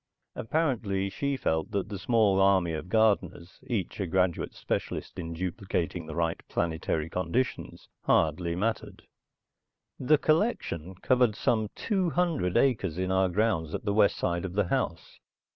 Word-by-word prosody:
Apparently 110 Hz, -9 st, -1 dB
she 140 Hz, +4 st, -2 dB
felt 80 Hz, -7 st, -1 dB
that 100 Hz, -2 st, -2 dB
the 100 Hz, -3 st, -5 dB
small 105 Hz, -3 st, +3 dB
army 95 Hz, -4 st, +3 dB
of 80 Hz, +3 st, -5 dB
gardeners, 100 Hz, -5 st, +1 dB
each 105 Hz, -7 st, -3 dB
a 95 Hz, -, -1 dB
graduate 90 Hz, -1 st, 0 dB
specialist -, -, -4 dB
in 85 Hz, -1 st, -5 dB
duplicating 90 Hz, -1 st, -3 dB
the 80 Hz, -, -6 dB
right 85 Hz, -1 st, -1 dB
planetary 80 Hz, -2 st, -1 dB
conditions, 115 Hz, +9 st, -2 dB, 0.2 s
hardly 85 Hz, +2 st, +2 dB
mattered. 110 Hz, +5 st, -3 dB, 1.0 s
The 150 Hz, +4 st, +4 dB
collection 155 Hz, -, 0 dB
covered 125 Hz, -4 st, +3 dB
some 110 Hz, -2 st, +1 dB
two 190 Hz, -5 st, 0 dB
hundred 160 Hz, -, 0 dB
acres 100 Hz, -, +1 dB
in 95 Hz, 0 st, -1 dB
our 95 Hz, 0 st, +3 dB
grounds 90 Hz, -5 st, 0 dB
at 120 Hz, -, -6 dB
the 100 Hz, -, +1 dB
west 100 Hz, -1 st, +4 dB
side 85 Hz, -1 st, -1 dB
of 95 Hz, -2 st, -4 dB
the 100 Hz, -2 st, 0 dB
house. -, -, -2 dB
95 Hz, 145 wpm, -28 LUFS, 85-115 Hz, 1.0 s, The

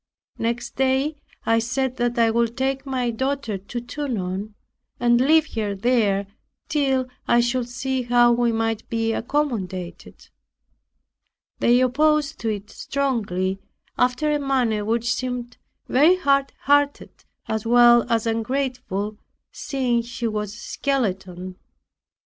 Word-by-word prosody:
Next 235 Hz, +1 st, -2 dB
day 270 Hz, +3 st, +1 dB, 0.3 s
I 225 Hz, 0 st, +3 dB
said, 255 Hz, +2 st, -2 dB, 0.2 s
"I 230 Hz, -1 st, +4 dB
would 235 Hz, +1 st, 0 dB
take 270 Hz, +1 st, -1 dB
my 255 Hz, -3 st, -1 dB
daughter 260 Hz, -3 st, -2 dB
to 205 Hz, +6 st, -6 dB
Tonon, 215 Hz, -6 st, -4 dB, 0.4 s
and 240 Hz, 0 st, +4 dB
leave 315 Hz, +3 st, +3 dB
her 210 Hz, -3 st, -2 dB
there, 205 Hz, -2 st, +1 dB, 0.4 s
till 270 Hz, -5 st, +1 dB, 0.2 s
I 240 Hz, -, +4 dB
should 240 Hz, 0 st, 0 dB
see 265 Hz, +1 st, -2 dB
how 240 Hz, 0 st, +4 dB
we 240 Hz, 0 st, +2 dB
might 225 Hz, -1 st, -2 dB
be 225 Hz, -1 st, 0 dB
accommodated." 205 Hz, -11 st, -3 dB, 1.3 s
They 245 Hz, +1 st, +4 dB
opposed 295 Hz, +2 st, +2 dB
it 210 Hz, -1 st, -3 dB
strongly, 205 Hz, -9 st, -1 dB, 0.4 s
after 250 Hz, +5 st, +1 dB
a 295 Hz, -, +1 dB
manner 250 Hz, -6 st, +1 dB
which 235 Hz, +2 st, 0 dB
seemed 245 Hz, -1 st, -4 dB, 0.3 s
very 305 Hz, +8 st, +5 dB
hard 275 Hz, -6 st, +2 dB
hearted 285 Hz, 0 st, +1 dB, 0.2 s
as 220 Hz, 0 st, -2 dB
well 240 Hz, 0 st, +6 dB
as 230 Hz, -1 st, +2 dB
ungrateful, 225 Hz, -3 st, -2 dB, 0.3 s
seeing 260 Hz, -5 st, -1 dB
she 235 Hz, 0 st, -4 dB
was 210 Hz, -2 st, -3 dB
a 210 Hz, -, -11 dB
skeleton. 185 Hz, -10 st, -3 dB
240 Hz, 120 wpm, -23 LUFS, 225-265 Hz, 1.3 s, well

